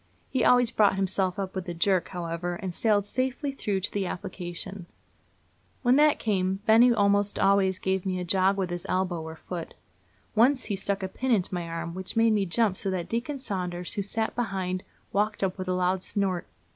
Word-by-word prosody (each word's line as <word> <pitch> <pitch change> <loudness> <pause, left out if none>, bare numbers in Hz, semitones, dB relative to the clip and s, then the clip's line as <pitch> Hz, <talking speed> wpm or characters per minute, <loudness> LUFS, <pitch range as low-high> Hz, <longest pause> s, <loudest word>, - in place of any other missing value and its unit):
He 260 - +1
always 245 -2 +5
brought 210 -4 +4
himself 190 -1 0
up 195 -2 -3
with 185 -2 -4
a 175 - -4
jerk, 185 +1 +2
however, 175 0 -4
and 185 0 -5
sailed 205 0 +2
safely 260 +6 -1
through 205 -7 -2
to 200 - -3
the 200 -2 -1
application. 180 0 -6 1.0
When 245 +1 +5
that 300 0 +5
came, 190 -3 0
Benny 230 +3 +6
almost 205 -2 +2
always 195 -1 +3
gave 190 -1 -1
me 185 -1 -2
a - - -2
jog 190 +2 +2
with 185 -2 -1
his 175 0 -3
elbow 185 -2 0
or 160 0 -7
foot. 170 0 -7 0.6
Once 255 +4 +4
he 205 - -2
stuck 195 0 -1
a - - 0
pin 260 +7 -4
into 195 -6 +2
my 175 -2 -3
arm, 165 0 -4
which 185 +4 -5
made 225 -1 +4
me 200 -2 +1
jump 200 +1 +2
so 195 - -2
that 180 -2 -3
Deacon 245 +5 -2
Saunders, 180 -8 -3
who 205 - -1
sat 220 +3 -2
behind, 190 -6 -2 0.3
waked 210 +1 +1
up 185 -1 0
with 185 - -4
a 185 - +1
loud 180 +1 +1
snort. 190 -3 -1
190 Hz, 200 wpm, -27 LUFS, 180-215 Hz, 1.0 s, Benny